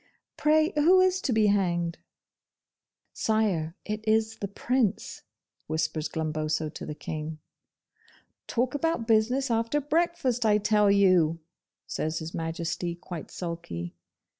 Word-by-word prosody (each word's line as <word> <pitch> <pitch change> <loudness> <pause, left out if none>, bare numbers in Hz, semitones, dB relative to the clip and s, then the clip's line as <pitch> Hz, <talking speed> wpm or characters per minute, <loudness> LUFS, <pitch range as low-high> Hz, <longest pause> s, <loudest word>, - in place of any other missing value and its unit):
Pray 310 +2 +3
who 335 +6 +5
is 370 0 +3
to - - -1
be 220 -2 +3
hanged?' 175 -5 +1 1.1
'Sire, 195 -7 0
it 215 0 -4
is 220 0 +2
the 200 - -4
Prince,' 225 +1 -1 0.5
whispers 155 -1 -1
Glumboso 155 0 -2
to - - -7
the 150 - -5
King. 155 0 -5 1.1
'Talk 250 +1 0
about 310 -5 0
business 240 +4 +2
after 230 +5 +1
breakfast, 295 -5 0
I 210 -1 +4
tell 210 0 +3
you!' 185 -5 +4 0.5
says 155 0 -2
His 160 +1 -6
Majesty, 170 +1 -3
quite 175 -2 -8
sulky. 165 - -5
205 Hz, 120 wpm, -27 LUFS, 165-245 Hz, 1.1 s, who